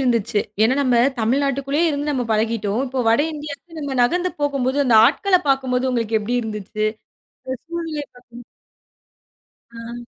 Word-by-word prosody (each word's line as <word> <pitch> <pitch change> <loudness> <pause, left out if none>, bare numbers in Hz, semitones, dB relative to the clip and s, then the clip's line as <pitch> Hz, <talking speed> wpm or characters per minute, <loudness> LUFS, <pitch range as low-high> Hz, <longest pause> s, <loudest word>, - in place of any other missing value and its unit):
இருந்துச்சு? 230 -5 +1 0.2
ஏனா 240 +4 +3
நம்ம 250 -3 +2 0.2
தமிழ்நாட்டுக்குள்ளே 275 +5 0
இருந்து 295 -1 -1
நம்ம 255 -3 -1
பழகிட்டோம். 220 0 0
இப்போ 260 0 -2
வட 230 +4 +4
இந்தியாவுக்கு 300 +3 -8
நம்ம 280 -3 -3
நகர்ந்து 355 +8 +1
போகும்போது, 275 -2 0
அந்த 240 -4 +4
ஆட்களப் 365 - +2
பாக்கும்போது 260 -1 +1
உங்களுக்கு 230 -3 0
எப்படி 240 +4 -2
இருந்துச்சு? 215 -1 -3 0.6
அந்தச் 260 -1 -6
சூழலை 330 -3 -4
பாக்கும் 245 -1 -13
போது - - -16 1.4
ஆ! 235 +1 -8
255 Hz, 140 wpm, -21 LUFS, 230-285 Hz, 1.4 s, வட